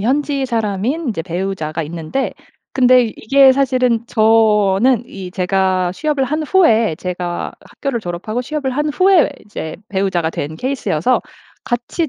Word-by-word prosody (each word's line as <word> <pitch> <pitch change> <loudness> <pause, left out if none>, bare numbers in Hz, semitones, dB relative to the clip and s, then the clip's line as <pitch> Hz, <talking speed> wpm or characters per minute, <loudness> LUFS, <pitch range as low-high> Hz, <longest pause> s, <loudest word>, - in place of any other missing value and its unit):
현지 275 +4 0
사람인 230 - -1
이제 180 -7 -3
배우자가 170 -3 -3
있는데 165 - -3 0.4
근데 255 -1 +5
이게 270 +3 +5
사실은 255 -3 +1
저는 220 +1 +3
이 190 -5 -8
제가 185 -1 0
취업을 295 +2 0
한 305 +4 -2
후에 230 - +3
제가 180 -1 -4
학교를 275 -5 -4
졸업하고 210 +6 -4
취업을 285 0 -3
한 295 +4 -1
후에 365 +2 +4
이제 160 -6 -6
배우자가 190 -4 0
된 155 0 -5
케이스여서 255 - 0 0.4
같이 260 +6 -2
225 Hz, 305 characters per minute, -17 LUFS, 185-270 Hz, 0.4 s, 근데